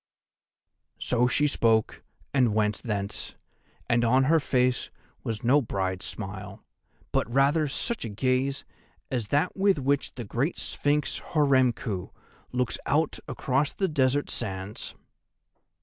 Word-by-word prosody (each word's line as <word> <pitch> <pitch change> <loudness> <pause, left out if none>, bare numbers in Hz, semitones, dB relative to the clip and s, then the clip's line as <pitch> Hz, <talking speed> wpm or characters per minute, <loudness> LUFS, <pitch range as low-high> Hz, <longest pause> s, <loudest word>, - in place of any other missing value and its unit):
"So 125 0 +2
she 145 +4 +2
spoke 115 -6 +2 0.3
and 125 -6 +3
went 105 -2 +1
thence, 100 -3 -3 0.5
and 120 -1 +3
on 130 +3 +4
her 160 +5 +4
face 125 -3 +1 0.3
was 110 -1 -2
no 135 +5 +5
bride's 95 -5 -2
smile, 100 -1 -7 0.5
but - - 0
rather 140 +4 +3
such 230 - -2
a 115 - -4
gaze 130 +5 0 0.5
as 120 -5 -1
that 145 - +1
with 195 -2 +3
which 140 0 0
the 120 - -5
great 125 - -1
sphinx, 145 0 0
Horemku, 130 - +1 0.4
looks 125 -1 0
out - - +1
across 135 +3 0
the 195 - 0
desert 145 -3 +1
sands." 95 -2 -3
125 Hz, 125 wpm, -27 LUFS, 110-140 Hz, 0.5 s, no